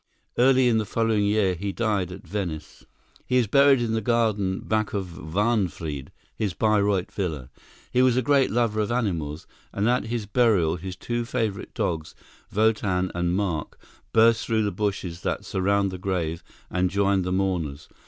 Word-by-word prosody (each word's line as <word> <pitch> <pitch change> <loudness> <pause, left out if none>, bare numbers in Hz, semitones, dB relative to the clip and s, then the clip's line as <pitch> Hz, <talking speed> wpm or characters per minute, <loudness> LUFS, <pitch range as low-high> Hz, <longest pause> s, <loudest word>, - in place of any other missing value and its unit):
Early 130 0 +4
in 115 -2 +3
the 110 - -1
following 110 -1 +1
year 100 -2 +2
he 100 +3 -3
died 100 -4 -1
at 95 +1 -10
Venice. 85 -4 -5 0.4
He 125 - +1
is 125 - +3
buried 140 +4 +5
in 115 -2 -1
the 110 - 0
garden 105 -4 +1
back 110 -1 -1
of 95 -3 -2
Wahnfried, 85 - -1 0.3
his 100 -6 -2
Bayreuth 105 -3 +1
villa. 75 -9 -4 0.4
He 125 - +3
was 130 -1 +4
a 130 - +2
great 140 +1 +3
lover 110 -2 +1
of 105 - -2
animals, 85 -11 -2 0.3
and 100 +2 0
at 125 +1 +2
his 115 -2 -3
burial 100 -8 +2
his 90 +1 -6
two 120 +3 -3
favorite 110 -4 -3
dogs, 80 -2 -2 0.4
Wotan 105 -4 +1
and 85 0 0
Mark, 95 -6 -2 0.3
burst 115 0 +4
through 110 -1 +1
the 105 - 0
bushes 95 -3 -3
that - - -2
surround 100 +1 +1
the 95 - -6
grave 85 -4 -2 0.3
and 90 0 +1
joined 100 0 +2
the 90 - -2
mourners. 90 -6 -1
100 Hz, 170 wpm, -25 LUFS, 90-115 Hz, 0.4 s, buried